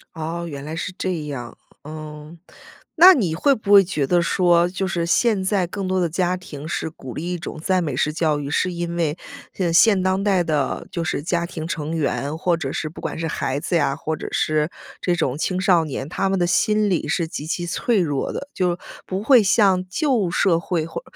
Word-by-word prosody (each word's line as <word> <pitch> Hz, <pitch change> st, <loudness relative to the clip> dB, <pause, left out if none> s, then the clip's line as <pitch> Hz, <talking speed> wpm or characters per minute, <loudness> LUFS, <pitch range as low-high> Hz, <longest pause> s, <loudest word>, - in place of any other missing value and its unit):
哦， 165 Hz, +2 st, -4 dB
原 140 Hz, -3 st, -7 dB
来 155 Hz, +2 st, -5 dB
是 180 Hz, +2 st, -4 dB
这 180 Hz, -5 st, -2 dB
样。 125 Hz, -5 st, -7 dB, 0.3 s
嗯， 155 Hz, +1 st, -9 dB, 0.6 s
那 365 Hz, +4 st, +10 dB
你 185 Hz, -, 0 dB
会 275 Hz, -, +3 dB
不 205 Hz, -3 st, 0 dB
会 200 Hz, -1 st, +9 dB
觉 170 Hz, -6 st, -1 dB
得 175 Hz, +5 st, +2 dB
说， 175 Hz, -1 st, +3 dB
就 190 Hz, +1 st, -2 dB
是 170 Hz, -2 st, -1 dB
现 210 Hz, +1 st, +2 dB
在 190 Hz, -2 st, +1 dB
更 190 Hz, +1 st, -5 dB
多 185 Hz, 0 st, 0 dB
的 175 Hz, -, +2 dB
家 180 Hz, +2 st, 0 dB
庭 150 Hz, -4 st, -9 dB
是 160 Hz, -, -2 dB
鼓 130 Hz, -6 st, -10 dB
励 175 Hz, +3 st, -4 dB
一 180 Hz, -, -2 dB
种 155 Hz, -, -7 dB
赞 185 Hz, +2 st, +1 dB
美 145 Hz, -5 st, -3 dB
式 150 Hz, +4 st, 0 dB
教 155 Hz, -2 st, +1 dB
育， 145 Hz, -, -5 dB
是 180 Hz, +5 st, 0 dB
因 170 Hz, 0 st, -4 dB
为， 165 Hz, -2 st, 0 dB, 0.4 s
呃， 175 Hz, -3 st, 0 dB
现 195 Hz, +1 st, +5 dB
当 190 Hz, +1 st, +1 dB
代 195 Hz, -4 st, +2 dB
的， 150 Hz, -4 st, -1 dB
就 170 Hz, -3 st, -2 dB
是 155 Hz, -, -2 dB
家 170 Hz, +1 st, -1 dB
庭 160 Hz, -2 st, -6 dB
成 160 Hz, 0 st, -3 dB
员， 150 Hz, -1 st, -1 dB
或 175 Hz, +1 st, +1 dB
者 140 Hz, -5 st, -4 dB
是 155 Hz, -, -3 dB
不 155 Hz, -, -11 dB
管 -, -, -4 dB
是 165 Hz, 0 st, -2 dB
孩 140 Hz, -3 st, -2 dB
子 175 Hz, -, -2 dB
呀， 140 Hz, -4 st, +2 dB
或 160 Hz, 0 st, -3 dB
者 -, -, -7 dB
是 155 Hz, 0 st, +1 dB, 0.3 s
这 175 Hz, -1 st, +1 dB
种 130 Hz, -6 st, -1 dB
青 180 Hz, +4 st, -1 dB
少 180 Hz, -3 st, +4 dB
年， 140 Hz, -3 st, -5 dB
他 195 Hz, +5 st, -1 dB
们 195 Hz, -, +1 dB
的 175 Hz, -, +2 dB
心 210 Hz, +4 st, +2 dB
理 170 Hz, -4 st, 0 dB
是 165 Hz, +2 st, 0 dB
极 155 Hz, -1 st, -6 dB
其 175 Hz, +2 st, -2 dB
脆 220 Hz, +5 st, 0 dB
弱 145 Hz, -6 st, -1 dB
的。 280 Hz, -, -5 dB
就 180 Hz, -2 st, 0 dB, 0.3 s
不 190 Hz, +2 st, -3 dB
会 250 Hz, 0 st, +6 dB
像 195 Hz, -2 st, +3 dB
旧 245 Hz, -, +1 dB
社 170 Hz, -1 st, +2 dB
会 170 Hz, -2 st, -2 dB
或， 165 Hz, -, -6 dB
170 Hz, 240 characters per minute, -22 LUFS, 155-185 Hz, 0.6 s, 那